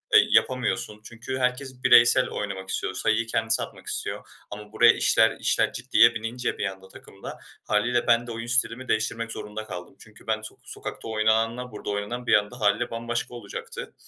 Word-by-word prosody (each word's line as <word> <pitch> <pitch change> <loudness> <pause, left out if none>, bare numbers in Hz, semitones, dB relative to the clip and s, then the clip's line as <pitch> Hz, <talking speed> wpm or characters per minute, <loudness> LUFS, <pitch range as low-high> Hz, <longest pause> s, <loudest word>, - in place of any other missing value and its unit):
eee, - - +7
yapamıyorsun 125 -4 +1
çünkü 120 +4 -6
herkes 130 0 -2
bireysel 120 +2 +6
oynamak 95 -2 -5
istiyor, 95 - -2
sayıyı 110 +4 +1
kendisi 115 0 0
atmak - - -11
istiyor. - - -5 0.2
Ama 105 0 -9
buraya 115 +2 +6
işler - - +3
işler - - +1
ciddiye 115 0 +4
binince 115 +3 -3
bir - - -2
anda 95 -1 -6
takımda - - -11 0.3
hâliyle 120 +3 +1
ben 120 0 +3
de 120 - -5
oyun 115 +1 -6
stilimi 120 +1 0
değiştirmek 115 +1 -1
zorunda 110 0 -6
kaldım. 90 -2 -8
Çünkü 110 0 -17
ben 110 -1 0
sok 110 - -11
sokakta - - -8
oynananla 115 +3 0
burada 105 - -7
oynanan 105 +4 -4
bir - - +3
anda 105 +3 +2
hâliyle 105 +3 +1
bambaşka 120 +1 -3
olacaktı. 105 -4 -8
115 Hz, 170 wpm, -25 LUFS, 105-120 Hz, 0.3 s, eee